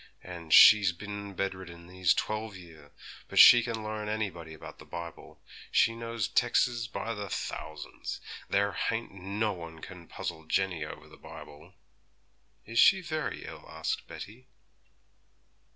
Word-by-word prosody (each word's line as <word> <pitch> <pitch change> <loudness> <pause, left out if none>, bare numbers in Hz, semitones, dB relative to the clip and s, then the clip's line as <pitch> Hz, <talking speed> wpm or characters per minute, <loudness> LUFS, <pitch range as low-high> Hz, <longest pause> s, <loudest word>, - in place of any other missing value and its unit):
And 85 -3 -9
she's 105 -1 +8
bin 100 +1 -7
bedridden 95 -3 -5
these 90 0 +1
twelve 110 -1 -3
year; 80 -5 -15 0.4
but - - -7
she 120 - +10
can 115 -2 -4
learn 110 0 -4
anybody 90 -7 -4
about - - -11
the - - -12
Bible; 85 -1 -9 0.3
she 115 - +4
knows 115 -2 -3
tex's 120 -1 +1
by 115 0 -4 0.2
thousands; 80 -3 -6 0.3
there 100 +1 +2
hain't 115 +5 -2
no 100 +3 -2
one 85 -2 -9
can 90 -1 -11
puzzle 80 0 -6
Jenny 95 -2 0
over 75 - -9
the - - -16
Bible.' 75 0 -13 0.9
'Is 115 +2 -1
she 190 -1 +6
very 155 -3 -4
ill?' - - -11
asked - - -3
Betty. 120 +6 -10
100 Hz, 135 wpm, -29 LUFS, 85-110 Hz, 0.9 s, she